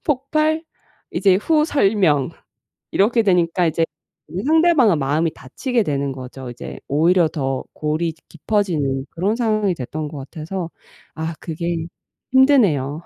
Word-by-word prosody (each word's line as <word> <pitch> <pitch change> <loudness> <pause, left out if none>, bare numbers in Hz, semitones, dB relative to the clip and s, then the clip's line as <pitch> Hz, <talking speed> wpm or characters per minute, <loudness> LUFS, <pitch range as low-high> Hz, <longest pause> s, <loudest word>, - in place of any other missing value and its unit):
폭발 310 +3 0 0.5
이제 190 -2 +4
후 305 +8 +2
설명 195 - +2 0.6
이렇게 225 +3 +3
되니까 180 -2 +2
이제 165 0 +1 0.6
상대방은 315 - +4
마음이 150 +4 +1
닫히게 230 - -2
되는 140 -4 -1
거죠. 130 -1 -8
이제 120 - -8
오히려 165 +4 +3
더 135 -4 -2
골이 155 +2 -1 0.2
깊어지는 155 -8 -1
그런 195 +6 0
상황이 215 -5 +1
됐던 150 +3 -5
것 145 -1 -8
같아서 165 +5 -5 0.5
아 160 +1 -3
그게 170 +1 -3 0.6
힘드네요. 185 - +4
170 Hz, 270 characters per minute, -20 LUFS, 150-220 Hz, 0.6 s, 이제